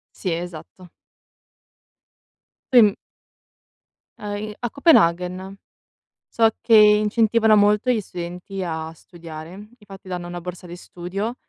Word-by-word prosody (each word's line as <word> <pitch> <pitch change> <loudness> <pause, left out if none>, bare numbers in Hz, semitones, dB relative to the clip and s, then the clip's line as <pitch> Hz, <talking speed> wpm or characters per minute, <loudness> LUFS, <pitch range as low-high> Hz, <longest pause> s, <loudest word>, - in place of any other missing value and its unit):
Sì 185 - -3
esatto. 175 +1 -8 1.8
Poi 250 - +8
m 205 -2 +4 1.3
A 205 -1 -5
i 215 +1 -6
a - - -2
Copenaghen, 185 - +2 0.7
so 225 -1 +3
che 230 - +1
incentivano 215 +1 +4
molto 210 +4 +3
gli 230 - +1
studenti 180 +1 -7
a 160 -2 -5
studiare. 165 -1 -11 0.3
Infatti 195 -4 -14
danno 180 -1 -5
una 175 0 -6
borsa 180 +1 -9
di 175 +1 -9
studio 195 +7 -6
190 Hz, 115 wpm, -22 LUFS, 175-210 Hz, 1.8 s, Poi